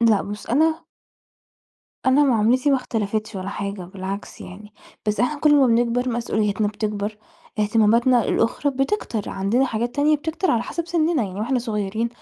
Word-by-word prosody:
لأ 225 Hz, -4 st, +4 dB
بُص، 205 Hz, +1 st, -7 dB
أنا 315 Hz, +6 st, +1 dB, 1.2 s
أنا 280 Hz, +3 st, +5 dB
معاملتي 250 Hz, +3 st, +3 dB
ما 270 Hz, -, +4 dB
اختلفتش 220 Hz, -3 st, -3 dB
ولا 190 Hz, +1 st, -5 dB
حاجة، 200 Hz, -1 st, -4 dB
بالعكس 190 Hz, +2 st, -7 dB
يعني، 210 Hz, +3 st, -11 dB, 0.3 s
بس 210 Hz, 0 st, 0 dB
إحنا 290 Hz, +4 st, 0 dB
كل 300 Hz, -1 st, +5 dB
ما 275 Hz, -3 st, +5 dB
بنكبر، 240 Hz, +2 st, +1 dB
مسؤوليتنا 215 Hz, -3 st, 0 dB
بتكبر، 210 Hz, 0 st, -3 dB, 0.4 s
اهتماماتنا 225 Hz, +3 st, +3 dB
الأخرى 250 Hz, +5 st, +1 dB
بتكتر، 270 Hz, -, -2 dB
عندنا 200 Hz, +7 st, +1 dB
حاجات 235 Hz, +1 st, -3 dB
تانية 300 Hz, +1 st, +3 dB
بتكتر 320 Hz, +5 st, -2 dB
على 235 Hz, -1 st, +2 dB
حَسَب 335 Hz, -1 st, -4 dB
سِنِّنا. 330 Hz, -5 st, +1 dB
يعني 195 Hz, 0 st, -5 dB
وإحنا 250 Hz, +3 st, 0 dB
صغيرين 220 Hz, -1 st, -2 dB
230 Hz, 150 wpm, -22 LUFS, 210-265 Hz, 1.2 s, أنا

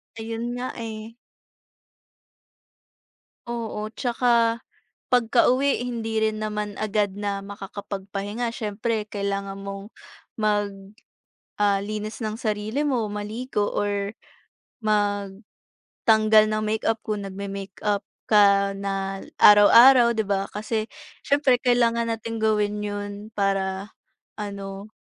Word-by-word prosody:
Ayun 230 Hz, +1 st, -4 dB
nga, 245 Hz, +1 st, -4 dB
eh. 225 Hz, -1 st, -7 dB, 2.3 s
Oo, 225 Hz, -2 st, -4 dB
'tsaka, 235 Hz, -2 st, +2 dB, 0.5 s
pagka-uwi 250 Hz, +3 st, +3 dB
hindi 225 Hz, -2 st, -2 dB
rin 215 Hz, 0 st, 0 dB
naman 210 Hz, -1 st, -3 dB
agad 210 Hz, -2 st, -1 dB
na 200 Hz, 0 st, -2 dB
makaka-pagpahinga. 200 Hz, +2 st, -5 dB
Siyempre, 220 Hz, -1 st, -2 dB
kailangan 200 Hz, -1 st, -3 dB
mong, 200 Hz, +2 st, -8 dB, 0.4 s
mag 205 Hz, -2 st, 0 dB, 0.8 s
ah, 200 Hz, -1 st, +2 dB
linis 215 Hz, +2 st, -5 dB
ng 215 Hz, -1 st, -3 dB
sarili 215 Hz, +4 st, -2 dB
mo, 250 Hz, -7 st, 0 dB
maligo 210 Hz, +1 st, -3 dB
or, 205 Hz, 0 st, -1 dB, 0.7 s
magtanggal 205 Hz, -2 st, -2 dB, 0.9 s
ng 215 Hz, 0 st, -1 dB
makeup, 220 Hz, +1 st, 0 dB
kung 210 Hz, -1 st, -3 dB
nagme-makeup 200 Hz, +1 st, -4 dB, 0.2 s
ka 200 Hz, -2 st, +5 dB
na 195 Hz, 0 st, -3 dB, 0.2 s
araw-araw, 235 Hz, +4 st, +8 dB
'di 220 Hz, -, +1 dB
ba. 195 Hz, 0 st, +1 dB
Kasi, 215 Hz, +1 st, -2 dB, 0.4 s
siyempre 280 Hz, -3 st, +3 dB
kailangan 235 Hz, -2 st, +2 dB
nating 225 Hz, 0 st, -5 dB
gawin 210 Hz, -1 st, +1 dB
'yon, 205 Hz, 0 st, -4 dB, 0.2 s
para 195 Hz, 0 st, -1 dB, 0.5 s
ano 200 Hz, 0 st, -6 dB
210 Hz, 100 wpm, -24 LUFS, 200-230 Hz, 2.3 s, araw-araw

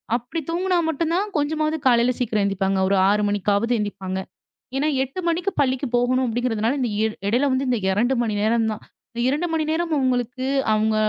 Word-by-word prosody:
அப்படி 250 Hz, +7 st, -4 dB
தூங்கினா 360 Hz, +2 st, +1 dB
மட்டும்தான் 335 Hz, +6 st, 0 dB
கொஞ்சமாவது 310 Hz, +1 st, 0 dB
காலையில 245 Hz, -1 st, +4 dB
சீக்கிரம் 215 Hz, -4 st, 0 dB
எந்திப்பாங்க, 195 Hz, -1 st, 0 dB
ஒரு 200 Hz, -, +2 dB
6 210 Hz, +1 st, +2 dB
மணிக்காவது 205 Hz, +3 st, +1 dB
எந்திப்பாங்க. 190 Hz, -2 st, -3 dB, 0.6 s
ஏன்னா 285 Hz, +3 st, +1 dB, 0.2 s
8 270 Hz, +7 st, -7 dB
மணிக்கு 350 Hz, +4 st, 0 dB
பள்ளிக்கு 260 Hz, 0 st, 0 dB
போகணும் 255 Hz, +2 st, +2 dB
அப்படிங்கிறதுனால, 230 Hz, -1 st, 0 dB
இந்த 245 Hz, -3 st, 0 dB
இ -, -, +2 dB, 0.3 s
எடையில 265 Hz, +5 st, +2 dB
வந்து 260 Hz, 0 st, 0 dB
இந்த 245 Hz, -3 st, +1 dB
2 240 Hz, +7 st, +1 dB
மணி 215 Hz, -2 st, -1 dB
நேரம் 225 Hz, +1 st, +2 dB
தான். 215 Hz, -, -6 dB, 0.3 s
இந்த 235 Hz, -, -3 dB
2 300 Hz, +6 st, 0 dB
மணி 315 Hz, -1 st, 0 dB
நேரம் 330 Hz, 0 st, -1 dB
அவங்களுக்கு, 255 Hz, -1 st, -1 dB, 0.3 s
அவங்க 215 Hz, 0 st, +1 dB
245 Hz, 175 wpm, -22 LUFS, 215-295 Hz, 0.6 s, காலையில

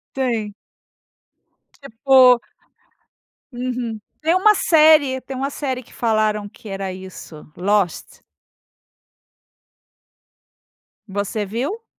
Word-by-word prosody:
Sim. 230 Hz, -6 st, -2 dB, 1.2 s
Tipo. 255 Hz, -1 st, +4 dB, 1.1 s
Uhum. 245 Hz, -3 st, -4 dB, 0.2 s
Tem 325 Hz, +3 st, +2 dB
uma 425 Hz, +3 st, +5 dB
série 305 Hz, -7 st, +4 dB
tem 265 Hz, +1 st, -8 dB
uma 275 Hz, +2 st, -2 dB
série 260 Hz, -3 st, -4 dB
que -, -, -20 dB
falaram 215 Hz, -2 st, 0 dB
que 215 Hz, -, -15 dB
era 195 Hz, -1 st, -4 dB
isso, 185 Hz, -4 st, -11 dB
Lost. 195 Hz, -1 st, -1 dB, 2.9 s
Você 200 Hz, +1 st, -3 dB
viu? 275 Hz, -, -4 dB
240 Hz, 85 wpm, -20 LUFS, 210-270 Hz, 2.9 s, uma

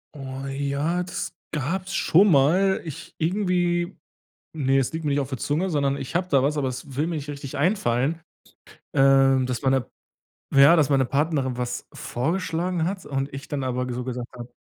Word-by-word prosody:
Oh, 135 Hz, -1 st, -6 dB
ja, 140 Hz, +5 st, -1 dB
das 180 Hz, -, -5 dB, 0.2 s
gab's 180 Hz, +6 st, -2 dB
schon 195 Hz, +5 st, +5 dB
mal. 175 Hz, +7 st, +4 dB
Ich 155 Hz, -, -8 dB
irgendwie, 175 Hz, 0 st, 0 dB, 0.6 s
ne, 135 Hz, -2 st, +2 dB
es 135 Hz, +3 st, -1 dB
liegt 160 Hz, -1 st, -4 dB
mir 145 Hz, -, +1 dB
nicht 145 Hz, -, +2 dB
auf 135 Hz, -2 st, -3 dB
der 130 Hz, -4 st, -4 dB
Zunge, 165 Hz, +6 st, 0 dB
sondern 140 Hz, -2 st, +1 dB
ich 135 Hz, +5 st, -7 dB
habe 180 Hz, +1 st, +1 dB
da 135 Hz, -4 st, +4 dB
was, 150 Hz, +2 st, +1 dB
aber 135 Hz, -2 st, 0 dB
es 130 Hz, +1 st, -6 dB
will 150 Hz, +3 st, 0 dB
mir 170 Hz, -, -2 dB
nicht 145 Hz, -1 st, -5 dB
richtig 140 Hz, -1 st, -6 dB
einfallen. 150 Hz, -, +1 dB, 0.7 s
Ähm, 135 Hz, -1 st, +5 dB
das 125 Hz, +1 st, -3 dB
war 135 Hz, -, +2 dB
'ne 135 Hz, -2 st, +1 dB, 0.7 s
ja, 140 Hz, +4 st, +8 dB
dass 150 Hz, -4 st, +3 dB
meine 135 Hz, -2 st, +3 dB
Partnerin 140 Hz, -2 st, 0 dB
was 120 Hz, 0 st, -4 dB
vorgeschlagen 170 Hz, +4 st, -1 dB
hat 185 Hz, +1 st, -3 dB
und 135 Hz, 0 st, -3 dB
ich 140 Hz, +1 st, -7 dB
dann 140 Hz, -2 st, -3 dB
aber 125 Hz, 0 st, -2 dB
so 125 Hz, -, -3 dB
gesagt 125 Hz, -1 st, -4 dB
habe 120 Hz, 0 st, -8 dB
140 Hz, 190 wpm, -24 LUFS, 135-170 Hz, 0.7 s, ja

